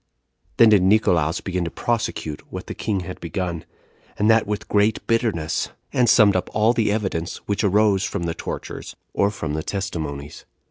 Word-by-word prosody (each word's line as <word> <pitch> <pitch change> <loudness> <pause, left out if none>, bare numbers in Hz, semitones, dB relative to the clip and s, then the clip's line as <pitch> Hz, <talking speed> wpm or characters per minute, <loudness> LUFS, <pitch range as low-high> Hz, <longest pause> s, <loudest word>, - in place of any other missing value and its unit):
Then 115 - +7
did 105 -3 +5
Nicolaus 90 -5 +3
begin 90 -2 -2
to - - -2
prosecute 110 -9 -2
what - - -6
the - - -6
king 100 -3 -2
had 90 +1 -7
begun, 85 -1 -4 0.5
and 105 +2 +4
that 110 -2 +3
with 105 +1 -3
great 105 +1 +1
bitterness; 110 -9 0 0.2
and 125 -2 +3
summed 105 -5 +6
up 90 - -1
all 110 +2 +4
the 115 -3 +1
evidence 95 -6 -2
which 100 +1 0
arose 100 -1 +3
from 85 - -2
the 85 -1 -1
tortures, - - -6 0.2
or 100 - +2
from 80 -7 -4
the 80 - -1
testimonies. 75 -7 -5
100 Hz, 175 wpm, -22 LUFS, 85-110 Hz, 0.5 s, Then